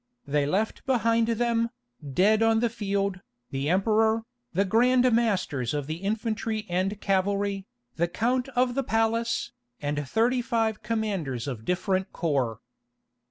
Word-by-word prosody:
They 145 Hz, 0 st, +1 dB
left 205 Hz, +8 st, -1 dB
behind 230 Hz, -3 st, +2 dB
them, 230 Hz, 0 st, +1 dB, 0.3 s
dead 195 Hz, +10 st, +3 dB
on 225 Hz, 0 st, +4 dB
the 235 Hz, -1 st, +1 dB
field, 200 Hz, -4 st, -1 dB, 0.3 s
the 135 Hz, +2 st, -1 dB
Emperor, 220 Hz, +4 st, +3 dB, 0.3 s
the 200 Hz, -2 st, +1 dB
Grand 250 Hz, +5 st, +4 dB
Masters 185 Hz, -, +1 dB
of 145 Hz, -2 st, -2 dB
the 155 Hz, +3 st, -4 dB
Infantry 215 Hz, +2 st, -2 dB
and 190 Hz, +3 st, -1 dB
Cavalry, 195 Hz, 0 st, 0 dB, 0.3 s
the 170 Hz, +1 st, +2 dB
Count 245 Hz, +8 st, 0 dB
of 250 Hz, 0 st, +2 dB
the 275 Hz, -, 0 dB
Palace, 225 Hz, 0 st, 0 dB, 0.3 s
and 145 Hz, -1 st, -3 dB
thirty 245 Hz, +3 st, +2 dB
five 225 Hz, -3 st, 0 dB
commanders 195 Hz, -, -2 dB
of 115 Hz, -5 st, -5 dB
different 185 Hz, +3 st, 0 dB
corps. 135 Hz, -, -1 dB
210 Hz, 135 wpm, -27 LUFS, 175-230 Hz, 0.3 s, on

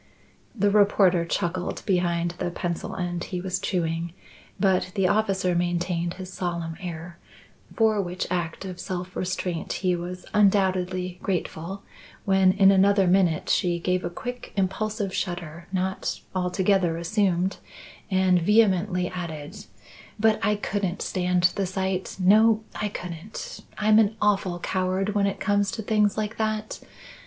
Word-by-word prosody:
The 205 Hz, -2 st, +2 dB
reporter 200 Hz, -4 st, +4 dB
chuckled 175 Hz, +1 st, -2 dB
behind 175 Hz, -3 st, +1 dB
the 180 Hz, -, -1 dB
pencil 170 Hz, -1 st, -4 dB
end 175 Hz, -1 st, -3 dB
he 180 Hz, -, -4 dB
was 185 Hz, 0 st, -2 dB
chewing, 165 Hz, -2 st, -2 dB, 0.5 s
but 190 Hz, -2 st, +2 dB
the 195 Hz, -2 st, +2 dB
officer 195 Hz, -3 st, +1 dB
maintained 175 Hz, 0 st, -1 dB
his 185 Hz, -1 st, -8 dB
solemn 170 Hz, -3 st, -3 dB
air, 170 Hz, 0 st, -7 dB, 0.6 s
for 220 Hz, -2 st, +3 dB
which 180 Hz, 0 st, -3 dB
act 175 Hz, +1 st, -2 dB
of 185 Hz, -2 st, -7 dB
self 180 Hz, 0 st, -5 dB
restraint 180 Hz, -2 st, -3 dB
he 180 Hz, -1 st, 0 dB
was 180 Hz, +1 st, -6 dB
undoubtedly 185 Hz, -3 st, +2 dB
grateful 185 Hz, 0 st, -3 dB, 0.4 s
when 190 Hz, -1 st, +4 dB
in 195 Hz, 0 st, +6 dB
another 195 Hz, 0 st, +4 dB
minute 180 Hz, -3 st, +2 dB
she 175 Hz, -1 st, +2 dB
gave 180 Hz, +1 st, 0 dB
a -, -, -2 dB
quick 245 Hz, +8 st, -7 dB
impulsive 195 Hz, +1 st, -1 dB
shudder 175 Hz, -2 st, -4 dB
not 190 Hz, 0 st, -2 dB
altogether 185 Hz, -1 st, +1 dB
assumed, 185 Hz, +1 st, 0 dB, 0.5 s
and 185 Hz, -2 st, +3 dB
vehemently 190 Hz, -2 st, +3 dB
added: 160 Hz, -5 st, -7 dB, 0.5 s
"But 220 Hz, 0 st, +3 dB
I 210 Hz, -, +3 dB
couldn't 200 Hz, -3 st, -2 dB
stand 180 Hz, -1 st, 0 dB
the 195 Hz, -2 st, -1 dB
sight; 190 Hz, 0 st, -2 dB
no, 215 Hz, +4 st, +5 dB
I 210 Hz, -, -2 dB
couldn't! 180 Hz, +1 st, -7 dB, 0.2 s
I'm 215 Hz, +1 st, +5 dB
an 215 Hz, 0 st, +3 dB
awful 195 Hz, -4 st, +1 dB
coward 185 Hz, +2 st, -1 dB
when 200 Hz, -1 st, +2 dB
it 200 Hz, -, -3 dB
comes 205 Hz, -1 st, +1 dB
to 220 Hz, -, -4 dB
things 210 Hz, -1 st, +2 dB
like 215 Hz, 0 st, -2 dB
that. 215 Hz, 0 st, -2 dB
185 Hz, 140 wpm, -25 LUFS, 175-200 Hz, 0.6 s, in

